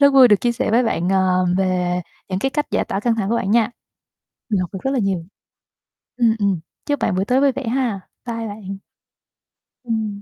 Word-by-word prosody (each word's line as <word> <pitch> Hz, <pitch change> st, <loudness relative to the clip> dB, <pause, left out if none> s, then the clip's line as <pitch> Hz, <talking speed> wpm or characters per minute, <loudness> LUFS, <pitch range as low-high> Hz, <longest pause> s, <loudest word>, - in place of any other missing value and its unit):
Rất 280 Hz, 0 st, +6 dB
vui 260 Hz, -2 st, +8 dB
được 205 Hz, -2 st, +4 dB
chia 240 Hz, -, +2 dB
sẻ 245 Hz, +1 st, -1 dB
với 235 Hz, +3 st, +4 dB
bạn, 180 Hz, -7 st, 0 dB
ờ, 185 Hz, -1 st, +3 dB
về 180 Hz, -1 st, +1 dB, 0.3 s
những 185 Hz, -, -1 dB
cái 270 Hz, +7 st, 0 dB
cách 295 Hz, +1 st, -1 dB
giải -, -, +1 dB
tỏa 195 Hz, -, -3 dB
căng 230 Hz, +1 st, +2 dB
thẳng 205 Hz, -3 st, -1 dB
của 235 Hz, -, +2 dB
bạn 195 Hz, -, -1 dB
nha. 230 Hz, +1 st, +3 dB, 0.8 s
Mình 205 Hz, -4 st, +1 dB
học 180 Hz, -, -3 dB
được 190 Hz, -, -4 dB
rất 270 Hz, -, 0 dB
là 270 Hz, -, +1 dB
nhiều. 190 Hz, -5 st, -1 dB, 0.9 s
Ừm, 230 Hz, -2 st, +3 dB
ừm. 200 Hz, -4 st, +1 dB, 0.3 s
Chúc 290 Hz, -1 st, 0 dB
bạn 190 Hz, -, 0 dB
buổi 190 Hz, -, 0 dB
tối 255 Hz, +4 st, +2 dB
vui 280 Hz, -1 st, +5 dB
vẻ 255 Hz, -2 st, -5 dB
ha. 240 Hz, -4 st, 0 dB, 0.3 s
Bye 230 Hz, -1 st, -3 dB
bạn. 200 Hz, -2 st, -7 dB, 1.1 s
Ừm. 220 Hz, -3 st, -2 dB
220 Hz, 215 wpm, -21 LUFS, 190-245 Hz, 1.1 s, vui